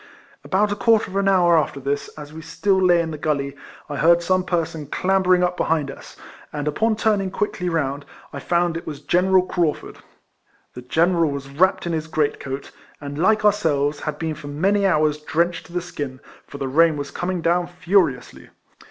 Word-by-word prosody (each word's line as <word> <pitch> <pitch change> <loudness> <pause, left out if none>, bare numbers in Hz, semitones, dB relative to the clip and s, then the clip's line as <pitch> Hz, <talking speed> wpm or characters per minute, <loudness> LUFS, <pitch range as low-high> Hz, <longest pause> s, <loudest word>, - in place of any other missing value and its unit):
About 205 +2 +1
a - - 0
quarter 215 0 +2
of - - -9
au - - +2
liour 185 -3 +4
after 140 - -5
this, 140 +1 -2
as 150 0 -9
we 160 - -8
still 165 +5 0
lay 175 -2 +5
in 165 - -5
the 155 - -6
gully, 140 -2 -1 0.3
I 145 - -5
heard 170 +2 +4
some 185 +1 +1
person 165 -4 -2
clambering 185 +2 +2
up 180 0 0
behind 155 -5 0
us, - - -13 0.3
and, 150 0 -4
upon 220 +9 +1
turning 210 -3 +1
quickly 185 -2 -2
round, 145 -4 -2 0.3
I 140 - -5
found 175 +2 0
it 165 - -9
was 150 -2 -6
General 180 +5 +3
Craufurd. 170 -4 -2 0.8
The 125 - -8
General 165 +5 +2
was 140 -1 -6
wrapped 185 +6 +2
in 170 - -2
his 160 -1 -2
great 155 -2 0
coat, 135 +1 -6 0.3
and, 145 0 -7
like 215 +4 +3
ourselves, 150 -8 +2
had 155 -1 -4
been 160 0 -3
for 150 - -10
many 195 +8 +1
hours 155 -4 +2
drenched 160 +2 -1
to 170 - -15
the 180 - -1
skin, 145 -7 -6 0.3
for 140 - -9
the 135 - -3
rain 160 +3 +3
was 145 0 -5
coming 180 0 -3
down 175 +1 +1
furiously. 175 -6 0
165 Hz, 195 wpm, -22 LUFS, 145-185 Hz, 0.8 s, lay